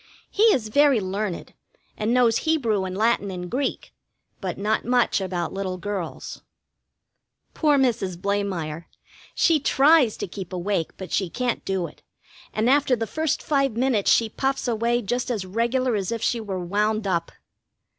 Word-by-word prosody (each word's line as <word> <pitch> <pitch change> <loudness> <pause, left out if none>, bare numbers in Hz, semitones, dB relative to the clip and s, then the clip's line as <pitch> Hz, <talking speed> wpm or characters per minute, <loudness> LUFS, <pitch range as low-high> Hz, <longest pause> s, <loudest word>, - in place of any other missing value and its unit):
He 405 - -2
is 250 - +3
very 285 0 +4
learned, 195 -1 -4 0.4
and 215 +2 -1
knows 240 -2 +3
Hebrew 235 -12 +1
and 185 0 -5
Latin 220 -2 +1
and 180 -1 -6
Greek, 270 +2 -2 0.5
but 185 -3 -4
not 210 +2 0
much 245 -4 +2
about 180 -2 -3
little 190 -1 -3
girls. 185 -3 -5 1.1
Poor 300 -3 +3
Mrs 220 -9 0
Blamire; 180 -5 -2 0.5
she 325 -2 +4
tries 280 -3 +4
to - - -4
keep 185 0 -8
awake, 180 -2 -2
but 190 -3 -8
she 190 -3 0
can't 245 +5 -2
do 190 -2 -1
it; - - -12 0.5
and 215 +2 0
after 275 -1 +4
the 225 -1 -2
first 315 +5 -1
five 275 -4 +1
minutes 235 -3 +2
she 230 - +4
puffs 270 +4 -2
away 235 +1 0
just 245 +5 -2
as 215 -6 -2
regular 235 +5 0
as 195 -1 -2
if 230 -1 -3
she 235 -2 0
were 190 -4 -4
wound 210 +3 0
up. 175 -3 -1
215 Hz, 160 wpm, -24 LUFS, 190-250 Hz, 1.1 s, very